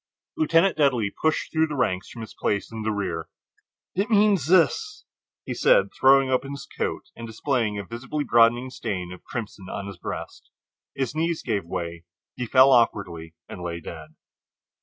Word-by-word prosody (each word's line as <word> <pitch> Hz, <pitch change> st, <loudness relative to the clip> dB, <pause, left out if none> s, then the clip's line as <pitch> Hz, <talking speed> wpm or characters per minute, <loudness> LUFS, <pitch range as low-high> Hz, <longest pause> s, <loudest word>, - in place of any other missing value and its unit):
Lieutenant 195 Hz, -, +3 dB
Dudley 125 Hz, -9 st, +2 dB
pushed 155 Hz, 0 st, -1 dB
through 160 Hz, 0 st, +2 dB
the 150 Hz, -, -5 dB
ranks 95 Hz, -8 st, -1 dB
from 115 Hz, -, -9 dB
his 110 Hz, -, -8 dB
place 100 Hz, +1 st, -2 dB
in 110 Hz, -1 st, -6 dB
the 110 Hz, -, -1 dB
rear. 100 Hz, -2 st, -3 dB, 0.6 s
"It 200 Hz, +5 st, -1 dB
means 205 Hz, -, +3 dB
this," 420 Hz, -, +2 dB, 0.4 s
he -, -, -3 dB
said, -, -, +3 dB
throwing 135 Hz, 0 st, +5 dB
open 135 Hz, +2 st, 0 dB
his 140 Hz, +1 st, -7 dB
coat -, -, -3 dB
and 115 Hz, -, -8 dB
displaying 110 Hz, -2 st, -1 dB
a 100 Hz, -, -5 dB
visibly 125 Hz, +7 st, -4 dB
broadening 120 Hz, +1 st, +3 dB
stain 90 Hz, -7 st, -4 dB
of 90 Hz, -, -13 dB
crimson 105 Hz, -5 st, -7 dB
on 100 Hz, -, -5 dB
his 100 Hz, -2 st, -8 dB
breast. -, -, -7 dB, 0.5 s
His 135 Hz, -2 st, -2 dB
knees 165 Hz, +1 st, -1 dB
gave 105 Hz, -7 st, -1 dB
way; 85 Hz, 0 st, -5 dB, 0.3 s
he 125 Hz, -1 st, -4 dB
fell 130 Hz, +3 st, +6 dB
awkwardly 85 Hz, -9 st, +1 dB
and 90 Hz, -, -9 dB
lay 85 Hz, -1 st, -4 dB
dead. 80 Hz, -1 st, -10 dB
120 Hz, 170 wpm, -25 LUFS, 100-150 Hz, 0.6 s, fell